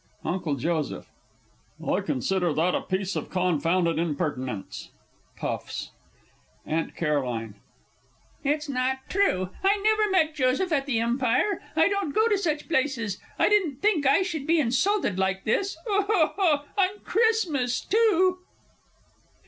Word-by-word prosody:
UNCLE 175 -5 -1
J. 155 +2 -2 0.8
I - - +1
consider 180 +6 0
that 175 +3 +2
a - - 0
piece 190 0 -2
of - - -4
confounded 175 -1 +1
impertinence! 145 - -3 0.5
[Puffs. - - -4 0.7
AUNT 160 +1 -2
C. 170 - -2 1.4
It's 300 +2 0
not 265 0 -2
true. 185 - +1
I 395 +2 +4
never 430 +1 +2
met 325 -5 +2
Joseph 270 +6 +1
at 280 -2 +1
the 240 -5 +1
Empire. 250 - +1
I 320 +1 +5
don't 400 -7 -2
go 440 +1 +4
to 415 - +3
such 310 -5 -2
places. 260 - -1 0.2
I - - +3
didn't 385 -9 +2
think 355 -10 +3
I 280 +8 +4
should 320 -6 -4
be 330 0 +3
insulted 270 - +1
like 190 0 0
this 380 - 0
(Weeps) 405 -2 0
on 365 +2 +1
Christmas 355 - +1
too! 375 -4 +2
285 Hz, 130 wpm, -26 LUFS, -, 1.4 s, I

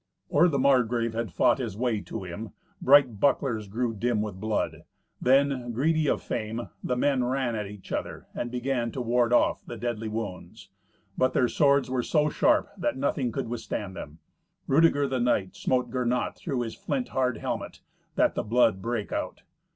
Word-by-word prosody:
Or 160 +5 +5
the 150 -5 0
Margrave 125 -4 +2
had 115 -4 -3
fought - - +3
his 95 - -4
way 115 -3 0
to 110 -1 -6
him, 95 +5 -7 0.3
bright 130 -6 +5
bucklers 120 -6 +1
grew 115 +3 -1
dim 115 +1 0
with 105 -3 -4
blood. 110 +1 -2 0.4
Then, 135 -2 +2
greedy 155 +5 +1
of - - 0
fame, 115 +1 -4
the 125 - 0
men 130 0 +2
ran 125 -1 0
at 105 -2 -3
each 100 -1 -11
other, - - -4
and 120 - -3
began 125 -1 -1
to 130 - -3
ward 120 0 +2
off 120 - +3
the 120 - -8
deadly 115 -1 -3
wounds. 100 -2 -6 0.5
But 130 0 +3
their 125 - +3
swords 140 0 +3
were 130 -1 0
so 150 +4 +2
sharp - - +2
that - - -1
nothing 130 -2 0
could - - -3
withstand 110 -4 -4
them. 75 -3 -8 0.5
Rudeger 145 -1 +4
the 130 -1 -1
knight 105 -6 +1
smote 125 -2 0
Gernot 125 -1 0
through 135 -6 -3
his 115 -2 -4
flint 255 -2 -3
hard 125 -3 0
helmet, - - -5 0.3
that - - +3
the - - -1
blood 110 -3 +2
brake 115 -1 -3
out. - - -4
120 Hz, 180 wpm, -27 LUFS, 110-130 Hz, 0.5 s, Or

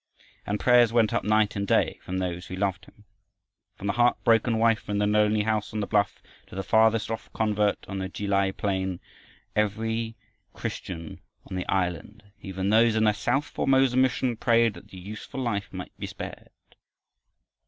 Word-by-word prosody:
And 105 +1 -1
prayers 120 -2 +5
went 115 -3 +3
up - - 0
night 105 0 +2
and 100 -1 -2
day - - +2
from 95 - -4
those 90 -1 -3
who 90 - -6
loved 95 -1 -2
him. 105 - -21 0.7
From - - -9
the 100 - +1
heart 120 0 +3
broken 115 0 +3
wife 115 -1 +2
in 105 - 0
the 105 - +2
lonely 105 0 +3
house 110 -1 -1
on - - 0
the 105 - -1
bluff 100 -1 0 0.2
to - - -12
the 95 - -3
farthest 110 +1 +3
off 115 - -5
convert 105 -2 0
on 95 -1 -4
the 95 0 -3
Ki 105 - -5
lai 100 -1 +2
plain, 95 -2 -2 0.6
every 110 +2 -1 0.4
Christian 85 -3 -6 0.3
on - - -6
the 90 - -3
island, 95 +3 -2 0.2
even 95 +1 -2
those 115 +1 +5
in 110 - +2
the 105 -1 +4
south 135 +7 0
Formosa 135 -3 +2
mission, 130 -1 +2
prayed 115 -1 +3
that - - -13
the 95 - -12
useful 105 +7 -8
life 110 -6 -2
might 90 -1 -8
be - - -4
spared. - - -8
105 Hz, 185 wpm, -26 LUFS, 95-115 Hz, 0.7 s, prayers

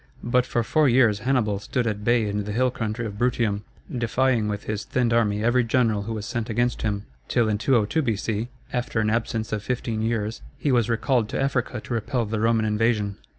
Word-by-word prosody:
But 125 +1 +2
for 120 - 0
four 150 +5 +3
years 120 -4 +4
Hannibal 110 -4 +1
stood 125 +4 -2
at 105 -2 -2
bay 115 -1 +3
in 105 0 -1
the 105 - -4
hill 125 +4 +2
country 115 0 -3
of 105 -1 -6
Bruttium, 115 -4 +1 0.3
defying 120 -1 +1
with 105 -1 -3
his 110 0 -3
thinned 120 -2 0
army 105 -3 +2
every 120 +2 +3
general 115 -3 +2
who 110 +3 -4
was 105 -2 -4
sent 115 +1 -3
against 120 +2 0
him, 105 -2 -2 0.2
till 120 -2 +2
in 105 -1 0
202 120 +4 +2
B.C., 110 -2 -1 0.3
after 125 -2 -1
an 110 -1 +1
absence 110 -1 -1
of 105 - -1
fifteen 115 -2 -2
years, 110 -1 -1 0.2
he 145 - 0
was 120 -2 +2
recalled 115 -1 +1
to - - -2
Africa 135 -3 0
to 120 - -6
repel 115 +1 -1
the 110 +1 -2
Roman 115 0 +2
invasion. 105 -2 +1
115 Hz, 205 wpm, -24 LUFS, 105-120 Hz, 0.3 s, years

